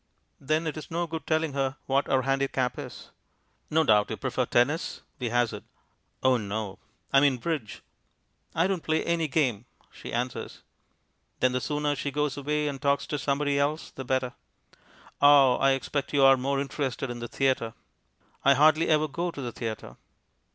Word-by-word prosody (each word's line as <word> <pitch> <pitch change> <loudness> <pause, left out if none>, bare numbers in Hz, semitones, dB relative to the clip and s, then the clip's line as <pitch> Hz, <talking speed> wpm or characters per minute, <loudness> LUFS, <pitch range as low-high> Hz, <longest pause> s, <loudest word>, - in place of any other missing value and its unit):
Then 155 +4 0
it 155 -1 -3
is 155 - -8
no 170 +1 -1
good 160 -1 -6
telling 155 -2 +1
her 135 0 -1
what 135 +1 +1
our 130 -1 +2
handicap 135 -2 0
is. - - -9 0.6
"No 160 +1 +3
doubt 105 -6 +4
your - - -4
prefer - - -1
tennis," 140 +7 +1 0.2
we 125 -2 -2
hazard. 120 -1 0 0.6
"Oh 130 -1 +4
no." 105 -2 -4 0.3
"I 135 - +7
mean 140 -2 +3
bridge." 145 -5 -4 0.7
"I 165 - +3
don't 190 -2 -1
play 160 0 0
any 170 -1 +1
game," 130 -7 0 0.3
she - - -9
answers. 125 +1 -4 0.8
Then 130 - +3
the 125 0 -1
sooner 150 0 -1
she 145 - -3
goes 150 0 -1
away 150 +1 -1
and 140 -2 -4
talks 140 -1 +1
to 150 - -3
somebody 140 +1 0
else 150 +3 -1
the 135 - -7
better. 130 -1 -1 0.9
"Ah, 140 -3 +7
I 135 0 +4
expect 140 +2 -3
you're 135 -1 +6
more 135 +2 -1
interested 135 -2 -3
in 120 - -6
the 120 - -5
theatre?" 130 -4 0 0.7
"I 140 0 +6
hardly 155 +3 +4
ever 155 -1 +3
go 170 +5 -3
to 165 - -8
the 125 -3 -4
theatre." 110 - -6
140 Hz, 170 wpm, -27 LUFS, 125-150 Hz, 0.9 s, I